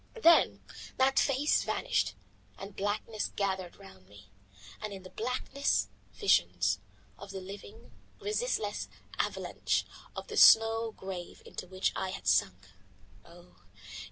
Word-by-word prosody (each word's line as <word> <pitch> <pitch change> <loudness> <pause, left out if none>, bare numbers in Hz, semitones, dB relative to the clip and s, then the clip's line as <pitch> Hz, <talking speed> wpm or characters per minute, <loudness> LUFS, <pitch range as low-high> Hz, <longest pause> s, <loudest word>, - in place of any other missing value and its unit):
Then 335 -5 +5 0.3
that 265 +1 +4
face 280 +2 +2
vanished - - 0 0.4
and 195 0 -9
blackness 210 +2 -2
gathered 190 -3 -2
round 95 - -15
me, 100 0 -16 0.5
and 215 -1 -4
in 190 -1 -9
the 185 - -11
blackness 250 - -1 0.2
visions: 90 +2 +2 0.4
of 200 - -10
the 195 0 -5
living, 200 +4 -11 0.3
resistless 450 +4 -1 0.3
avalanche, - - -1 0.3
of - - -6
the - - -5
snow 225 0 +7
grave 190 -4 -8
into - - -7
which 185 +1 0
I 190 - -2
had 185 - -7
sunk 95 +1 +1 0.5
oh! 175 +1 -17
195 Hz, 125 wpm, -31 LUFS, 175-225 Hz, 0.5 s, snow